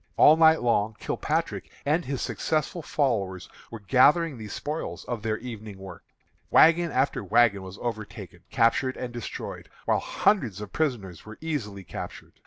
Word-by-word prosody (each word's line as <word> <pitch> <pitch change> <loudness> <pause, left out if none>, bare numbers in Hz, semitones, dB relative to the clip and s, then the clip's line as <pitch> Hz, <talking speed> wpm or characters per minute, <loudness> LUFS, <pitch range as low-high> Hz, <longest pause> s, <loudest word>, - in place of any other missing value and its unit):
All 155 - +8
night 160 -2 +5
long 110 -2 +1
Kilpatrick - - -2 0.2
and 155 +4 +2
his 135 -1 -3
successful 155 - -1
followers 105 - -1 0.2
were 115 - -8
gathering 145 - +4
the 110 - -7
spoils 150 +9 -5
of 120 -3 -4
their 110 0 -1
evening 110 -4 -8
work. 95 -3 -10 0.5
Wagon 165 +1 +5
after 130 -5 0
wagon 100 +1 +3
was 95 +1 -9
overtaken, 110 -3 -6
captured, 130 +3 +2
and 125 -1 -5
destroyed, 120 -2 -7 0.2
while - - +2
hundreds 125 - +1
of 105 -2 -8
prisoners 115 - -2
were 110 0 -11
easily 115 -12 -4
captured. - - -8
120 Hz, 150 wpm, -26 LUFS, 105-150 Hz, 0.5 s, All